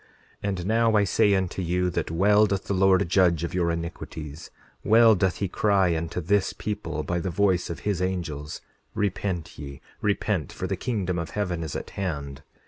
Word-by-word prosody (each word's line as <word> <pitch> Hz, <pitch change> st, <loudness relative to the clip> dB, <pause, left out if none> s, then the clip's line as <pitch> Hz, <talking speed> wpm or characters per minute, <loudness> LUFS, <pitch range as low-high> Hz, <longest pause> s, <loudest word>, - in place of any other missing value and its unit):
10:20 105 Hz, -, 0 dB
And 90 Hz, -3 st, -3 dB
now 115 Hz, +1 st, +3 dB
I 105 Hz, -, +5 dB
say 100 Hz, +1 st, +3 dB
unto 95 Hz, 0 st, -1 dB
you 90 Hz, +1 st, 0 dB
that -, -, -2 dB
well 105 Hz, +5 st, +4 dB
doth 100 Hz, -1 st, -1 dB
the -, -, -2 dB
Lord 95 Hz, -2 st, +4 dB
judge 85 Hz, -3 st, +3 dB
of 85 Hz, -, -3 dB
your 90 Hz, -2 st, +1 dB
iniquities; 80 Hz, -2 st, -6 dB, 0.3 s
well 115 Hz, +1 st, +6 dB
doth 95 Hz, -2 st, +1 dB
he 100 Hz, -, -2 dB
cry 95 Hz, -3 st, +2 dB
unto 85 Hz, +2 st, -3 dB
this 100 Hz, +3 st, +1 dB
people, 85 Hz, -8 st, -4 dB
by 85 Hz, +2 st, -1 dB
the 95 Hz, -, -2 dB
voice 95 Hz, 0 st, +1 dB
of 85 Hz, -, -6 dB
his 100 Hz, -4 st, -1 dB
angels: 80 Hz, -6 st, -3 dB, 0.3 s
Repent 95 Hz, -4 st, -2 dB
ye, 70 Hz, -1 st, -8 dB, 0.2 s
repent, 100 Hz, -4 st, 0 dB
for -, -, -5 dB
the -, -, -1 dB
kingdom 95 Hz, -7 st, -2 dB
of 85 Hz, -, -4 dB
heaven 90 Hz, -5 st, -2 dB
is 80 Hz, -4 st, -5 dB
at -, -, -5 dB
hand. 70 Hz, -7 st, -4 dB
90 Hz, 190 wpm, -26 LUFS, 85-100 Hz, 0.3 s, well